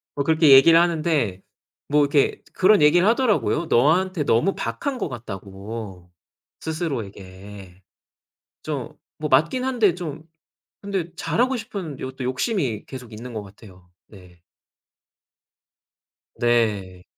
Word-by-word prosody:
뭐 140 - -1
그렇게 160 0 +4
얘기를 150 +5 +8
하는데 155 - 0 0.5
뭐 150 +1 +3
이렇게 145 0 +1
그런 200 +2 +4
얘기를 160 +5 +5
하더라고요. 225 -8 +1
너한테 160 +6 +2
너무 130 +9 +2
박한 115 - -3
것 230 - -3
같다고 100 -4 -8 0.5
스스로에게. 100 - -7 0.8
좀 - - -5 0.2
뭐 150 0 -4
맞긴 165 - +2
한데 235 -9 +2
좀 160 -4 -7 0.6
근데 195 -5 -4
잘하고 255 +3 0
싶은 200 - -6
요것도 130 0 -7
욕심이 130 - -2
계속 125 -4 -10
있는 120 +3 -9
것 110 - -4
같아요. 95 -3 -16 0.2
네. 90 -4 -17 2.0
네. 105 -7 0
140 Hz, 245 characters per minute, -23 LUFS, 105-170 Hz, 2.0 s, 얘기를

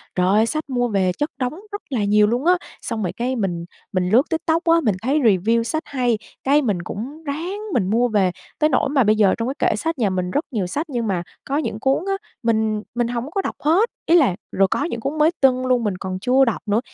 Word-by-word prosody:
trời 180 -1 +2
ơi, 210 +4 +4
sách 305 +4 -3
mua 245 -2 +1
về 195 -4 +1
chất 295 - -1
đống 250 +1 -1 0.2
rất 410 - -5
là 245 -7 -1
nhiều 210 +1 +4
luôn 240 +6 -1
á. 355 - +6 0.3
Xong 230 -4 -3
rồi 180 - -1
cái 250 +2 -2
mình 175 -7 -2 0.3
mình 180 -1 0
lướt 245 +8 +4
TikTok 325 0 0
á, 335 0 +4
mình 215 -5 +2
thấy 275 +6 +1
review 225 -1 +3
sách 315 +8 -2
hay, 245 -4 0 0.3
cái 285 +2 +4
mình 205 -10 -1
cũng 255 - -7
ráng 325 +7 -4
mình 190 -6 +1
mua 235 +4 +3
về, 200 -5 +2 0.3
tới 305 0 +4
nỗi - - +1
mà 275 -2 +3
bây 215 0 +3
giờ 205 -3 +4
trong 230 +1 -2
cái - - +3
kệ - - 0
sách 325 +9 -2
nhà 220 -6 +1
mình 185 -1 -2
rất 290 - 0
nhiều 205 -7 -1
sách 290 - -2
nhưng 240 -4 -2
mà 180 -4 -1 0.2
có 275 - -2
những 260 -8 -2
cuốn 270 +7 +1
á, 390 - +1 0.3
mình 220 -2 +1
mình 240 -1 +1
hổng 245 +4 -4
có 390 - 0
đọc - - -4
hết 355 +10 +3 0.2
ý 335 - +4
là, 270 - +4 0.2
rồi 195 0 +3
có 285 - +1
những 235 -8 -3
cuốn 275 +7 -3
mới 310 +2 +4
tưng 255 -1 +3
luôn 250 -2 +2
mình 200 -3 -1
còn 185 -1 -4
chưa 260 +5 +4
đọc 230 - 0
nữa, 210 +1 +2
240 Hz, 255 wpm, -21 LUFS, 210-290 Hz, 0.3 s, á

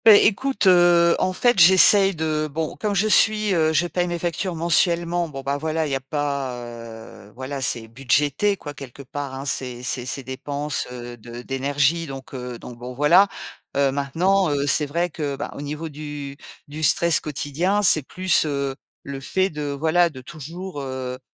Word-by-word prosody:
É 215 -2 +9
écoute, 265 +4 0
heu, 175 -2 +5
en 185 - +1
fait, 240 +3 +1
j'essaye 190 +2 +7
de 155 -1 -2
bon, 160 +2 -3
comme 210 -2 -2
je 200 +3 +2
suis, 215 -1 +3
heu, 160 -2 +2
je 160 +2 +2
paye 175 0 -1
mes 175 0 -3
factures 175 +2 -3
mensuellement, 170 +1 +1
bon 135 -2 -7
ben, 140 +1 -1
voilà, 160 +1 -1
il 145 - -4
y - - +1
a - - -1
pas, 140 -1 -3 0.7
heu, - - -18
voilà, 135 +2 -6
c'est 115 -2 -1
budgété 140 - 0
quoi 145 -4 -8
quelque 135 -1 -11
part, 140 0 -6
hein, 135 +1 -7
ces 125 -2 0
ces 125 0 0
ces 135 - -2
dépenses, 140 +3 -3
heu, 120 -1 -8
de 120 +2 -10
d'énergie, 140 +5 0
donc 135 -1 -9
heu, 125 -2 -6
donc 120 0 -11
bon 125 +1 -8
voilà. 170 +9 +5 0.5
Heu, 140 -1 +2
maintenant, 170 +7 +1
heu, 145 -1 -1
c'est 145 +1 +4
vrai 170 +4 -2
que 145 -3 -4
bah, - - -6
au - - -7
niveau 150 +3 -5
du 145 -2 -7 0.3
du 150 +2 -8
stress 160 +2 +3
quotidien, 155 +8 -2
c'est 160 -5 +6
plus, 185 +5 +1
heu, 140 -2 -2 0.3
le 140 -1 -7
fait 190 +8 -1
de 150 -1 -4
voilà 160 +5 +2
de 130 -5 -11
toujours, 165 +4 -8
heu 130 -1 -5
150 Hz, 190 wpm, -22 LUFS, 135-175 Hz, 0.7 s, É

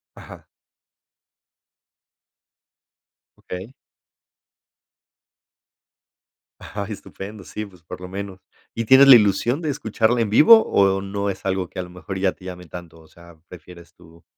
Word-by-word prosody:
Ajá. - - -14 2.9
Okey. 95 +8 -9 2.9
Ah, 100 0 -7
estupendo. 105 -1 -9
Sí, 105 +3 -7
pues, 90 -5 -18
por 85 - -10
lo 90 - -9
menos, 95 0 -7 0.3
¿y 115 0 -4
tienes 135 +3 +7
la 135 - +11
ilusión 120 - +2
de 155 - -3
escucharla 115 -3 0
en 105 - -1
vivo, 220 - +7
o, 95 -1 +2
no 100 +1 -4
es 95 0 -7
algo 95 -2 -2
que 95 - -9
a - - -1
lo 90 - -12
mejor 90 +2 -8
ya 95 -1 +1
te 95 - -17
llame 90 -1 -9
tanto? 85 0 -11
O 80 - -20
sea, 85 0 -18
prefieres 90 -1 -14
tú, 85 -1 -20
95 Hz, 140 wpm, -21 LUFS, 90-110 Hz, 2.9 s, la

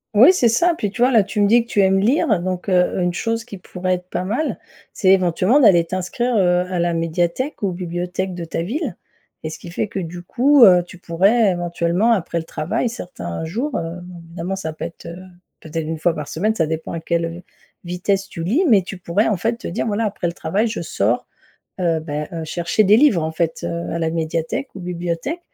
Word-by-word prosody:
Oui 255 - +8
c'est 250 -10 +3
ça, 340 +10 +3
puis 210 - -2
tu 235 +5 -1
vois, 255 - +4
là, 225 -4 +6
tu 210 - -4
me 205 - +5
dis 235 +3 +5
que 235 - -23
tu 205 - +3
aimes 195 0 +3
lire 215 - +2
donc 185 +1 -3
heu, 180 -1 +2
une 175 -1 0
chose 230 +4 -2
qui 210 -5 -10
pourrait 185 +1 -2
être 180 0 -10
pas 180 - -2
mal, 230 +11 -1 0.3
c'est 190 - +1
éventuellement 185 - +3
d'aller 190 - +5
t'inscrire, 185 +8 -2
heu, 180 -3 +3
à 180 -1 -2
la 170 0 +1
médiathèque 170 - -1
ou 200 -2 0
bibliothèque 180 +1 -3
de 175 -1 -5
ta 165 0 -3
ville 250 - -3 0.5
et 155 - -4
ce - - -8
qui 175 - -10
fait 180 +5 -2
que 195 - -5
du 175 0 -6
coup, 265 +8 +4
heu, 180 -3 +6
tu 180 - -13
pourrais 195 +6 +3
éventuellement 175 +4 0
après 180 -6 0
le - - -5
travail, 170 +10 -2
certains 160 - -6
jours, 240 - -2
heu, 165 +1 -4
bon, 180 0 -11
évidemment 170 +3 -5
ça 160 -5 -5
peut 155 - -6
être, 170 - -10
heu, 170 0 -7 0.4
peut-être 160 0 -5
1 160 0 -4
fois 165 +1 +1
par 150 -1 -5
semaine 215 +7 -1
ça 165 - +1
dépend 160 +1 -4
à 165 - -3
quelle, 170 +1 -1
heu, 170 +2 -7 0.4
vitesse 190 +3 -1
tu 165 - -6
lis. 240 - +2
Mais 215 -8 +5
tu 185 +1 -8
pourrais 180 +4 0
en 210 -4 +1
fait 230 +5 -1
te - - -6
dire: 185 +7 -2
«Voilà 220 +1 0
après 205 -3 -3
le 170 - 0
travail 195 +7 0
je 220 -4 -4
sors, 120 -7 -1 0.5
heu 165 -3 +1
bah 150 -1 -4
heu, 165 -3 -5
chercher 170 +6 0
des 210 +3 +6
livres 230 - +4
en 160 - -2
fait, 165 0 -2
heu, 170 0 -3
à 170 - -2
la 160 -1 0
médiathèque 165 - -2
ou 195 - -8
bibliothèque» 175 - -3
180 Hz, 235 wpm, -20 LUFS, 170-215 Hz, 0.5 s, Oui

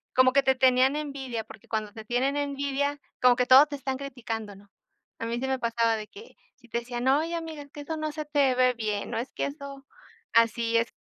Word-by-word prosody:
como 255 0 +6
que 275 +1 +3
te 265 0 +3
tenían 260 +2 +4
envidia, 270 -6 -4
porque 215 - -15
cuando 215 -2 -2
te 220 -1 -10
tienen 260 +5 0
envidia, 285 0 -1 0.2
como 250 -1 +6
que 250 - +1
todo 265 +4 +8
te 290 -1 -6
están 265 -1 -3
criticando, 230 -6 -6
¿no?, 200 0 -19 0.5
a 230 - -3
mí 235 +1 -2
sí 265 - -2
me 265 -1 -1
pasaba 230 -1 +1
de 215 -1 -6
que 435 +3 -14 0.2
si 240 - -21
te 235 - -2
decían: 240 +1 -4
"Oye, 315 +5 +2
amiga, 320 -3 -6
que 290 - -9
eso 320 +3 -4
no 310 -1 -3
se 305 0 -5
te 285 -3 +2
ve 255 0 +4
bien, 215 -2 -3
no 225 - -2
es 245 +4 -4
que - - -2
eso, 280 -1 -8 0.5
así 230 0 +3
es 230 +1 0
260 Hz, 230 wpm, -27 LUFS, 230-280 Hz, 0.5 s, todo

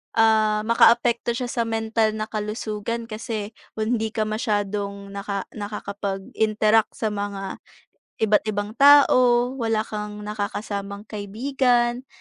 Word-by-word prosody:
ah, 215 -1 +3
maka-apekto 235 +1 +3
siya 250 -1 -3
sa 235 -1 -1
mental 225 -1 0
na 215 - -2
kalusugan 215 +1 -3
kasi, 220 -2 -5 0.2
kung 220 +2 0
hindi 220 0 -3
ka 215 - +1
masyadong 205 -3 -2
naka 200 -1 -4
nakakapag-interact 210 +1 -1
sa 220 -2 -2
mga, 200 -1 -4 0.6
iba't 215 -1 +4
ibang 205 0 -2
tao, 255 -4 +6
wala 225 -2 +1
kang 210 -1 -6
naka-kasamang 205 -1 -4
kaibigan, 240 +3 0
215 Hz, 115 wpm, -23 LUFS, 205-230 Hz, 0.6 s, tao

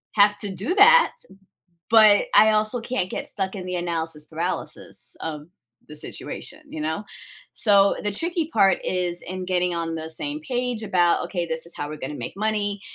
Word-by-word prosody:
have 205 0 +5
to 200 -2 -4
do 210 - -2
that, 480 +5 +7 0.8
but 215 -2 +6
I 215 +2 +7
also 215 +3 +1
can't 225 -6 -2
get - - -3
stuck 190 -1 -2
in 185 -2 -6
the 180 - -4
analysis 165 -3 -3
paralysis 165 +4 -5
of 155 -1 -6 0.4
the 150 - -9
situation, - - -6
you 155 - -7
know, 160 +6 -2 0.5
so, 200 -2 +4
the 210 - 0
tricky 330 - -2
part 195 -1 +4
is 180 -1 -1
in 185 +1 -5
getting 180 -1 0
on 165 -1 -2
the 160 0 -5
same 290 - -1
page 245 -3 -2
about, 175 -5 +2
"Okay, 175 -3 -3
this 160 -1 -2
is 170 - -7
how 145 - -4
we're 155 - -6
gonna 135 +1 -5
make 125 +3 -7
money," 205 -1 -1
190 Hz, 180 wpm, -23 LUFS, 170-215 Hz, 0.8 s, that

